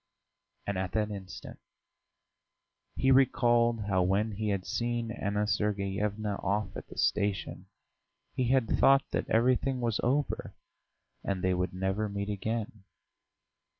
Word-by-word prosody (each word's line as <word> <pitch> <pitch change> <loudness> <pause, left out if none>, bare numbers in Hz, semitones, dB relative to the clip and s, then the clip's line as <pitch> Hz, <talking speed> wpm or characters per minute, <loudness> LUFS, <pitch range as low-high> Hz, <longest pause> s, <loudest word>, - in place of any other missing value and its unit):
And 100 -2 -2
at 95 -1 -3
that 105 -1 0
instant 95 -2 -8 1.4
he 135 - +3
recalled 120 -3 +4
how 100 -3 +1
when 100 +4 +1
he 105 +1 -2
had 100 -2 -1
seen 120 -1 -2
Anna 105 -2 -1
Sergeyevna 105 0 -1
off 105 +2 -1
at - - -7
the - - -13
station 100 -3 0 0.7
he 130 - 0
had 130 -2 +3
thought 135 +4 +5
that - - -2
everything 125 +3 +2
was 115 -3 0
over 140 +4 -1 0.7
and 95 -2 -2
they 95 0 +2
would 90 0 -2
never 95 +3 -1
meet 100 0 -3
again. 110 0 -3
105 Hz, 130 wpm, -30 LUFS, 100-120 Hz, 1.4 s, thought